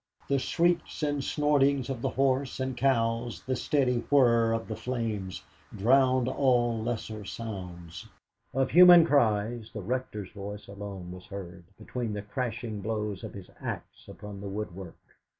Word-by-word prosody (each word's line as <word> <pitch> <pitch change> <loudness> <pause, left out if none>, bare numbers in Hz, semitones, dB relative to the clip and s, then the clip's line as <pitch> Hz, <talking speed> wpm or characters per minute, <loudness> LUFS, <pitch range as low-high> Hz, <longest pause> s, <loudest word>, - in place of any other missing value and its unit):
The 140 -1 +2
shrieks 170 +2 0
and 145 -2 0
snortings 140 -3 +2
of 130 -4 -4
the - - 0
horse 135 0 0
and 130 -1 -2
cows, 120 -2 0
the 130 0 -1
steady 125 -2 +1
whirr 115 -5 +5
of 115 0 -2
the 110 - -4
flames, 110 -5 -3 0.3
drowned 130 +3 +4
all 120 -4 +2
lesser 110 -2 -4
sounds. 90 -6 -7 0.4
Of 130 0 0
human 175 -1 +9
cries, 115 -5 +1
the 110 - -6
Rector's 105 -3 -3
voice 105 0 -7
alone 100 -3 -7
was 90 0 -10
heard, 90 -3 -8
between 120 -4 -4
the 105 -1 -4
crashing 110 -1 -4
blows 105 -2 -3
of - - -7
his 95 -2 -10
axe - - -6
upon 105 -1 -9
the 100 - -5
woodwork. 95 -3 -6
115 Hz, 150 wpm, -29 LUFS, 105-130 Hz, 0.4 s, human